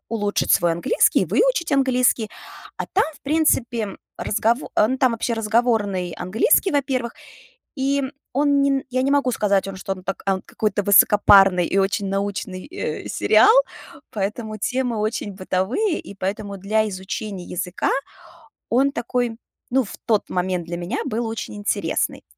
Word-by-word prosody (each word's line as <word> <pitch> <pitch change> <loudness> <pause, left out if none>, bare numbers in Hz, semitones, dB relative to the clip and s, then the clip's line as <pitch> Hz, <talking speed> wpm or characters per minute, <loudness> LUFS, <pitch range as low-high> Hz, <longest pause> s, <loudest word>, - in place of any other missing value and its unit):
улучшить 205 -3 0
свой 170 -1 +3
английский, 170 - +2
выучить - - +1
английский, 250 -4 +2 0.5
а - - -4
там, 400 - +3
в - - -24
принципе, 250 -8 0 0.2
разгово 230 +4 0
а 210 - +4
ну 260 +2 -1
там 255 -2 +3
вообще 230 +1 -2
разговорный 215 -5 0
английский, 210 - +2
во-первых. 260 -5 -1 0.6
И 275 0 0 0.3
он 285 +1 +2
нен 275 -1 +1
я 255 0 0
не 270 +2 +1
могу 280 -3 +2
сказать 200 -4 +1
вам, 195 - -6
что 195 +1 -3
он 185 -1 -13
так 195 - -4
а 190 -1 0
какой-то 210 -2 -2
высокопарный 195 -2 +6
и 195 - -1
очень 195 +1 +1
научный, 195 -1 -3
э, 370 +6 -5
сериал, 440 - +5 0.6
поэтому 215 +2 -4
темы 245 +2 -1
очень 215 -1 -2
бытовые. 190 - -1
И - - -10
поэтому 200 +1 -4
для 215 +3 0
изучения 190 0 -6
языка 180 +1 -3 0.8
он 270 +4 +3
такой, 240 -2 -2 0.3
ну 265 +2 +3
в 200 - -10
тот 220 -4 +1
момент 180 -1 -1
для 175 - -4
меня 175 +1 -4
был 230 +2 -2
очень 225 -1 -5
интересный 205 0 -1
215 Hz, 150 wpm, -22 LUFS, 195-255 Hz, 0.8 s, высокопарный